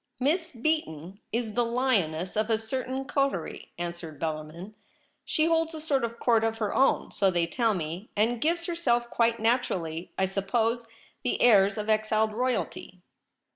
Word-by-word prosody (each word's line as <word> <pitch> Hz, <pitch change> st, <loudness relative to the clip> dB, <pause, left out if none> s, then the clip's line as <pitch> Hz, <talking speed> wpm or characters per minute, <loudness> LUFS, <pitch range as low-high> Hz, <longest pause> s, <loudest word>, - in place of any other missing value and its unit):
' -, -, -44 dB
Miss 330 Hz, +1 st, 0 dB
Beaton 225 Hz, -, -2 dB
is 230 Hz, -1 st, -2 dB
the 240 Hz, -, +2 dB
lioness 210 Hz, -9 st, 0 dB
of 215 Hz, +1 st, 0 dB
a 225 Hz, -, +3 dB
certain 260 Hz, +4 st, -3 dB
coterie,' 275 Hz, -, -2 dB
answered 170 Hz, -3 st, -6 dB
Bellarmin. 160 Hz, +5 st, -5 dB, 0.3 s
' -, -, -37 dB, 0.2 s
She 310 Hz, -, +2 dB
holds 325 Hz, 0 st, +1 dB
a -, -, -5 dB
sort 285 Hz, -4 st, 0 dB
of 235 Hz, 0 st, -3 dB
court 230 Hz, -2 st, +3 dB
of 225 Hz, 0 st, 0 dB
her 215 Hz, -3 st, -1 dB
own, 270 Hz, -, +2 dB
so 195 Hz, -, +2 dB
they 175 Hz, -2 st, +1 dB
tell 225 Hz, +4 st, +1 dB
me, 170 Hz, +4 st, -5 dB
and 230 Hz, +2 st, +1 dB
gives 335 Hz, +2 st, +1 dB
herself, 240 Hz, -9 st, 0 dB
quite 230 Hz, 0 st, +2 dB
naturally, 185 Hz, -8 st, -1 dB
I 190 Hz, -, +3 dB
suppose, 225 Hz, +5 st, 0 dB, 0.3 s
the 250 Hz, -, -1 dB
airs 205 Hz, -3 st, +5 dB
of 210 Hz, 0 st, -3 dB
exiled 215 Hz, 0 st, +2 dB
royalty.' 230 Hz, -6 st, -2 dB
225 Hz, 170 wpm, -28 LUFS, 190-255 Hz, 0.3 s, airs